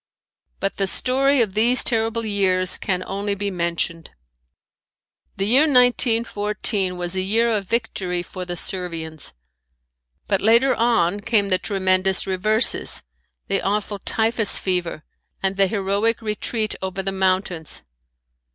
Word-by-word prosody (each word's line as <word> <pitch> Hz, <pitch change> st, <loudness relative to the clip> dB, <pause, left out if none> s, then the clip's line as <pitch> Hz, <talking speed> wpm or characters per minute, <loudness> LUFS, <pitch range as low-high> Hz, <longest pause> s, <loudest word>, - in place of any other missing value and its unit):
But 195 Hz, -, -2 dB
the 195 Hz, -, 0 dB
story 265 Hz, +4 st, +3 dB
of 200 Hz, -4 st, -5 dB
these 235 Hz, +5 st, +3 dB
terrible 225 Hz, -1 st, 0 dB
years 190 Hz, -3 st, +3 dB
can 185 Hz, -2 st, -2 dB
only 200 Hz, +1 st, -3 dB
be 200 Hz, 0 st, -3 dB
mentioned. 170 Hz, -2 st, -3 dB, 1.3 s
The 195 Hz, -, -1 dB
year 265 Hz, +9 st, +4 dB
1914 225 Hz, -7 st, +2 dB
was 175 Hz, +1 st, -2 dB
a 185 Hz, -, 0 dB
year 225 Hz, +5 st, +2 dB
of 205 Hz, -4 st, -2 dB
victory 185 Hz, -6 st, -2 dB
for 185 Hz, +1 st, -7 dB
the 175 Hz, -1 st, -5 dB
Servians. 165 Hz, -, -4 dB, 0.9 s
But 195 Hz, -, 0 dB
later 235 Hz, +5 st, +4 dB
on 225 Hz, -5 st, +1 dB
came 205 Hz, -2 st, +1 dB
the 185 Hz, -1 st, +2 dB
tremendous 190 Hz, -1 st, +1 dB
reverses, 215 Hz, +5 st, +1 dB, 0.4 s
the -, -, 0 dB
awful 205 Hz, 0 st, -2 dB
typhus 225 Hz, 0 st, 0 dB
fever 180 Hz, -4 st, -2 dB, 0.4 s
and 195 Hz, 0 st, 0 dB
the 195 Hz, 0 st, +3 dB
heroic 200 Hz, +3 st, 0 dB
retreat 215 Hz, 0 st, -2 dB
over 190 Hz, 0 st, -4 dB
the 195 Hz, -, -2 dB
mountains. 185 Hz, -4 st, -1 dB
200 Hz, 130 wpm, -21 LUFS, 185-225 Hz, 1.3 s, year